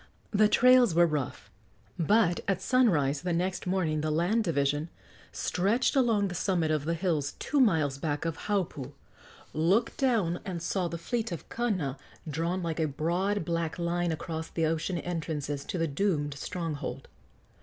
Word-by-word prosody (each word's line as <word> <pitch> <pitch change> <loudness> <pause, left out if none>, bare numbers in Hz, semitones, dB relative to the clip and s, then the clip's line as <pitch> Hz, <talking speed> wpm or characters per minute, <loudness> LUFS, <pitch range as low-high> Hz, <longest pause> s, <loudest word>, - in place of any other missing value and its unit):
The 210 0 +5
trails 250 -4 +5
were 175 0 +6
rough, 150 -5 -3 0.5
but 175 +1 +3
at 195 -2 +1
sunrise 160 - +2
the 180 0 -1
next 180 +2 -1
morning 170 -5 0
the 155 - -1
land 175 +9 +2
division, 145 -1 0 0.4
stretched 210 +10 +1
along 230 -6 +3
the 180 - -5
summit 175 -3 0
of 150 -2 0
the 165 +1 0
hills 160 -5 -1
two 295 - 0
miles 155 - +3
back 150 +1 -2
of 165 -2 -1
Haupu, 165 -9 -2 0.6
looked 185 +10 +2
down 215 -10 +1
and 180 -3 -4
saw 180 +2 -1
the 170 - -4
fleet 225 +5 -2
of 170 - -6
Kana 185 - -1 0.3
drawn 165 +5 -1
like 165 -1 -2
a 160 - +2
broad, 175 +6 -1
black 165 -1 -2
line 175 0 0
around 160 0 -4
the 165 - +2
ocean 165 +3 -1
entrances 155 -5 -3
to - - -3
the 165 -1 +1
doomed 145 -2 0
stronghold. 155 +1 -5
170 Hz, 160 wpm, -29 LUFS, 155-195 Hz, 0.6 s, were